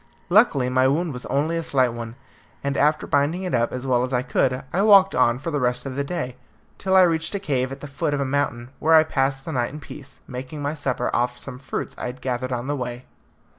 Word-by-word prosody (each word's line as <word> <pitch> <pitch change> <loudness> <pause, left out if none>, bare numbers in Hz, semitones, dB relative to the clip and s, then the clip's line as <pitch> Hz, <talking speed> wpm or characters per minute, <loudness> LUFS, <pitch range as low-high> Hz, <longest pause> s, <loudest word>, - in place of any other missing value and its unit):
Luckily 175 - +4
my 130 +1 +3
wound 155 +3 0
was 125 - -7
only 150 +5 0
a 165 - -2
slight 130 -5 +2
one, 115 0 -7 0.5
and 140 0 -1
after 150 +2 +2
binding 145 +6 +1
it 180 - -3
up 120 -1 +1
as 125 +1 -5
well 125 -2 +2
as 125 +1 -2
I 125 -1 +1
could, 130 0 0
I 190 - +2
walked 200 -2 +6
on 120 0 +3
for 145 +6 -5
the 145 - 0
rest 125 0 0
of 135 -2 -5
the 140 - -1
day, 140 -5 -4 0.4
till 190 -1 +1
I 190 - +8
reached 165 +1 0
a - - -1
cave 135 -8 -1
at 135 +1 -8
the 145 - -6
foot 145 +1 -1
of - - -2
a 140 - 0
mountain, 130 -3 -1
where 160 +1 +4
I 155 - +8
passed 135 -3 -1
the 160 - -4
night 125 -4 -1
in 150 - -8
peace, 145 -1 -11
making 130 +4 -7
my 145 +1 -2
supper 130 -5 -2
off 125 0 0
some 125 0 -7
fruits 130 - -5
I - - -3
had 125 +1 -7
gathered 130 0 -3
on 120 0 -2
the 145 +2 -1
way. 125 -1 -5
135 Hz, 250 wpm, -23 LUFS, 125-155 Hz, 0.5 s, I